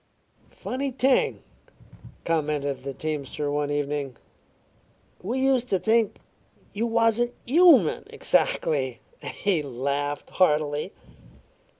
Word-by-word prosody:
"Funny 275 +2 -3
thing," 265 0 +1 0.8
commented 145 -4 -1
the 140 - -4
teamster 145 0 -4
one 145 0 -1
evening. 145 -3 -2 1.0
"We 235 +8 -2
used 265 -2 +2
to 195 - +2
think 220 +2 +1 0.6
you 225 +3 -1
wasn't 230 +1 +2
human 280 - +5
exactly." 130 -5 0 0.2
He 195 -6 -1
laughed 140 +2 -3
heartily. 150 -4 +1
155 Hz, 90 wpm, -25 LUFS, 145-235 Hz, 1.0 s, human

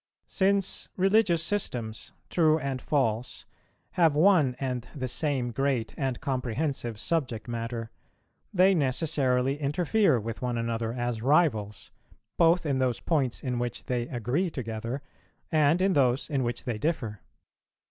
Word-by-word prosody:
Since 195 -1 0
religious 190 -3 +3
systems, 120 - -3 0.2
true 155 -2 +4
and 135 -4 -3
false, 125 -4 -1 0.5
have 165 -4 +3
one 155 -6 +4
and 125 -3 -3
the 130 -3 -3
same 130 -2 -1
great 130 -2 -1
and 135 -3 -2
comprehensive 130 -2 -2
subject 125 -5 -2
matter, 115 -1 -4 0.6
they 190 +1 +5
necessarily 135 -3 +1
interfere 165 - +2
with 115 +1 -6
one 125 -1 -1
another 115 -1 -2
as 120 -2 -3
rivals, 110 - +1 0.4
both 170 +1 +4
in 140 -3 0
those 125 -3 +1
points 140 -7 0
in 125 -2 -1
which 120 -1 -4
they 120 -1 -1
agree 130 - -1
together, 115 0 -5 0.5
and 155 +3 +3
in 195 0 +3
those 135 0 +2
in 140 -2 +1
which 120 -1 -2
they 120 -5 -3
differ. 120 - -2
130 Hz, 135 wpm, -28 LUFS, 120-160 Hz, 0.6 s, they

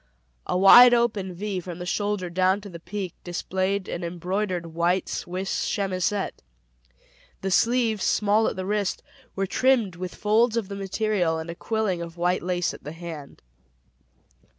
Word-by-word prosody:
A - - 0
wide 240 +6 +9
open 210 -5 0
V 195 +2 -4
from 175 -1 -7
the 180 - -6
shoulder 205 -1 -2
down 185 +2 +2
to 200 - -9
the 170 -2 -9
peak 185 +1 -5
displayed 190 +2 -2
an 175 - -4
embroidered 180 0 -3
white 175 +3 +1
Swiss 185 +2 -3
chemisette. 195 0 -1 1.0
The 195 - -2
sleeves, 230 0 +2
small 210 +1 +2
at - - -2
the 185 - -4
wrist, 205 -1 -1 0.3
were 195 - 0
trimmed 235 -3 +2
with 180 0 -6
folds 225 +2 +2
of 210 -4 -2
the 200 - -5
material 195 -3 0
and 160 +1 -5
a - - -8
quilling 215 -4 -1
of 170 0 -8
white 175 +1 +1
lace 180 0 -1
at - - -12
the 150 - -7
hand. 165 -4 -9
190 Hz, 160 wpm, -25 LUFS, 175-210 Hz, 1.0 s, wide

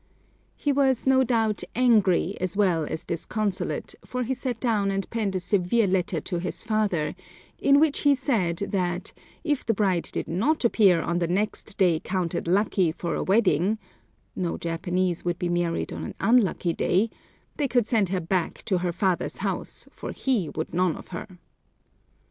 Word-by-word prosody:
He 290 - 0
was, 270 -3 +2
no 265 0 +5
doubt, 225 -4 +1
angry 210 -6 +3
as 185 +2 -2
well 180 -6 +2
as 160 - -5
disconsolate, 200 +3 -2
for 250 0 -3
he 255 +3 -1
sat 250 -3 -3
down 215 -5 +1
and 195 0 -2
penned 215 -4 -1
a - - +1
severe 200 +4 +2
letter 185 -3 0
to 175 +1 -3
his 180 - -3
father, 215 -8 0 0.5
in 280 0 +5
which 305 -2 +3
he 285 -1 +4
said 220 - 0
that, 180 -2 -1 0.3
if 295 -5 0
the 225 - 0
bride 190 -5 +1
did - - -3
not 235 - +1
appear 195 -7 +4
on 170 +1 0
the 170 - 0
next 200 +3 -2
day 175 -5 +3
counted 175 -3 -2
lucky 190 -2 +2
for 170 +1 -4
a - - -1
wedding 195 -1 +2 0.6
(no 175 -2 -2
Japanese 175 +1 -1
would 175 -1 -1
be 175 - -2
married 175 -1 -1
on - - -5
an - - -6
unlucky 210 -7 +2
day), 210 +7 +1 0.5
they 290 - +1
could 245 -3 +2
send 215 -5 +1
her 185 0 0
back 175 +1 -2
to 185 -3 +1
her 175 0 -1
father's 185 0 -1
house, - - -4
for - - -7
he 230 - 0
would 160 - -4
none 180 -2 +2
of - - -11
her. 185 +1 -8
195 Hz, 175 wpm, -26 LUFS, 175-230 Hz, 0.6 s, no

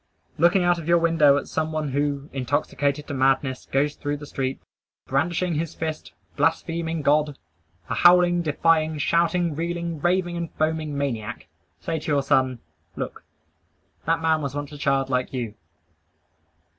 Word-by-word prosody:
Looking 175 +3 +4
out 175 -1 +3
of 165 - -8
your 170 0 +5
window 165 -4 +4
at - - -3
some 160 0 -2
one 155 -2 -2
who, 140 +1 -1
intoxicated 140 +2 -1
to 145 - -6
madness, 135 0 +1
goes 145 +2 +2
through 145 -1 -3
the 145 - -9
street, 135 -2 -3 0.5
brandishing 170 +6 0
his 165 +1 -3
fist, 160 -1 -5 0.2
blaspheming 165 +1 0
God, 150 0 +2 0.5
a - - -2
howling, 175 0 +5
defying, 160 0 +2
shouting, 170 +1 +1
reeling, 170 -1 -3
raving 175 0 +1
and 170 -1 -4
foaming 155 -2 -1
maniac, 125 -5 -3 0.3
say 165 -1 -3
to 155 - -4
your 140 -1 +2
son, 130 -2 +2 0.4
"Look; - - -5 0.8
that 165 0 +1
man 160 -1 +2
was 140 -1 -4
once 145 0 -4
a 150 - -8
child 135 -1 +1
like 125 +1 0
you." 120 -5 -3
155 Hz, 155 wpm, -24 LUFS, 140-165 Hz, 0.8 s, your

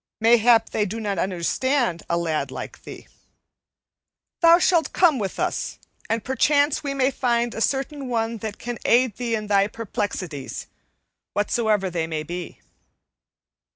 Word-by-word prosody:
Mayhap 230 0 +5
they 215 - +1
do 215 +3 -4
not 200 -4 -2
understand 190 - 0
a 170 - +1
lad 160 -3 -1
like - - -8
thee. - - -10 1.3
Thou 335 0 +8
shalt 345 -2 +2
come 325 -8 +4
with 195 -3 -4
us, - - -2 0.3
and 225 -2 0
perchance 285 +4 +2
we 280 -1 -3
may 265 0 +2
find 240 -2 0
a 225 - -5
certain 275 +2 -1
one 230 -1 -1
that 215 -1 -6
can 240 0 -6
aid 245 -3 +3
thee 235 -1 -1
in 215 -1 -4
thy 200 -1 +3
perplexities, 195 -9 -4 0.7
whatsoever 210 -2 +1
they 165 -2 -2
may 155 -1 -3
be." 175 +2 -7
225 Hz, 145 wpm, -23 LUFS, 195-260 Hz, 1.3 s, Thou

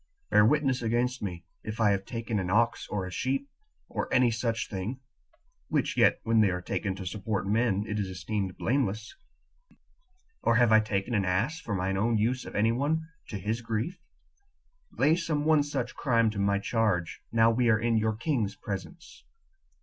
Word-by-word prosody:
Bear 105 - +6
witness 135 +1 +2
against 120 +2 0
me, 90 -4 -5 0.2
if 110 +1 -6
I 105 -2 +4
have 100 -1 -1
taken 115 -3 -3
an 90 -2 -2
ox 115 +4 +2
or 100 -3 -2
a 90 - -7
sheep, 135 - -1 0.4
or - - -4
any 125 -1 +4
such 115 -1 -1
thing, 105 +7 -4 0.7
which - - 0
yet - - +4
when 115 -1 +3
they 105 - +4
are 90 -1 -2
taken 95 +1 -3
to 95 0 -7
support 100 +2 -2
men, 105 -1 +1
it 105 0 -2
is 100 - -1
esteemed 95 0 -3
blameless; 115 -4 -1 1.3
or 115 - +3
have 120 -1 +4
I 110 - +8
taken 105 +1 -2
an 105 -3 +2
ass 110 - 0
for 110 -9 -4
mine 95 +1 -1
own 115 +3 +2
use 120 +4 0
of - - -9
any 110 +2 +3
one 155 +6 -1 0.2
to 105 - -5
his 110 +5 -2
grief?lay 175 - -4
some 155 -4 -1
one 155 -1 +5
such 135 -4 -3
crime 115 -5 +2
to 105 - -5
my 100 0 +2
charge, 100 -5 0
now 115 0 +5
we 120 +1 +2
are 110 - +5
in 115 +1 +1
your 110 0 +1
king's 115 -5 -1
presence." 135 - -7
115 Hz, 180 wpm, -28 LUFS, 100-125 Hz, 1.3 s, I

